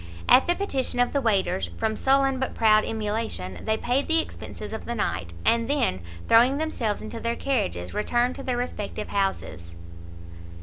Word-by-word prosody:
At 265 - +6
the 350 - +3
petition 270 -11 -2
of 245 - +2
the 280 - +1
waiters, 195 - +1
from 220 - -1
sullen 270 +1 +2
but 265 - -3
proud 215 -1 +4
emulation, 210 - -3
they 220 0 0
paid 255 +5 0
the 325 0 +4
expences 215 -8 -6
of 220 - -6
the 235 - -3
night, 85 - -2
and 230 0 +3
then 260 - +1 0.3
throwing 245 +4 +5
themselves 260 -9 -2
into 230 +1 -6
their 235 +1 -1
carriages, 90 - -2
returned 240 +4 +1
to - - -7
their 250 -2 -1
respective 215 -3 -4
houses. 140 - -2
230 Hz, 170 wpm, -25 LUFS, 205-260 Hz, 0.3 s, At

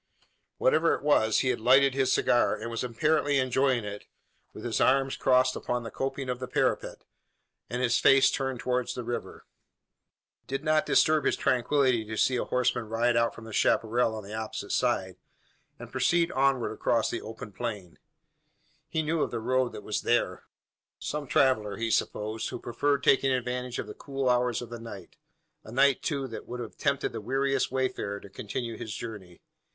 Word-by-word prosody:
Whatever - - +3
it - - -9
was, 110 -7 +3
he 130 - 0
had 125 - 0
lighted 130 +4 +5
his 135 -1 +1
cigar, 120 - +3
and 115 +1 -6
was 115 - -3
apparently 145 +4 +1
enjoying 130 -2 +1
it, 105 0 -7 0.4
with - - -10
his - - -1
arms 135 0 +3
crossed 130 0 +3
upon 125 0 -2
the 115 - -7
coping 135 0 -3
of 125 -1 -3
the 130 - -5
parapet, - - -1 0.7
and 125 +1 -2
his 120 -1 +3
face 135 0 +6
turned 135 -2 -2
towards 125 0 -1
the 125 - -4
river. 120 +1 -5 1.0
It - - -46
did 135 +2 -3
not 155 -1 +2
disturb 155 -2 +3
his - - +2
tranquillity 130 -1 +2
to 110 0 -6
see 130 - +3
a - - -1
horseman 125 -2 0
ride 120 +2 +1
out 115 0 +2
from 110 - -11
the 110 - -9
chapparal 115 +1 +2
on 110 - -6
the 100 +2 -9
opposite 110 -2 -5
side, 95 -7 0 0.6
and - - -10
proceed 170 -1 +2
onward 135 -2 +1
across 115 +1 0
the 120 - -3
open 110 0 -8
plain. 100 -5 -6 0.9
He 160 - -1
knew 155 +1 0
of - - 0
the 120 - -3
road 125 +2 +1
that - - -8
was 105 - -2
there. 120 - 0 0.5
Some 150 -1 -4
traveller, 115 -7 +2
he 115 0 -1
supposed, 110 +1 -1
who - - -5
preferred 140 +4 -1
taking 135 0 +4
advantage 125 0 -2
of - - -3
the - - -8
cool 135 -2 -3
hours 125 -1 +1
of 120 - -11
the 120 - -6
night 100 -6 -10 0.5
a 110 - -11
night, 135 +2 +3
too, 140 -3 -2
that 115 - -8
would 125 - -6
have 115 -2 -7
tempted - - 0
the - - -6
weariest 135 +4 0
wayfarer 130 -6 -2
to 100 - -12
continue 115 +3 -5
his 110 - -6
journey. 100 -7 -8
125 Hz, 190 wpm, -28 LUFS, 115-135 Hz, 1.0 s, face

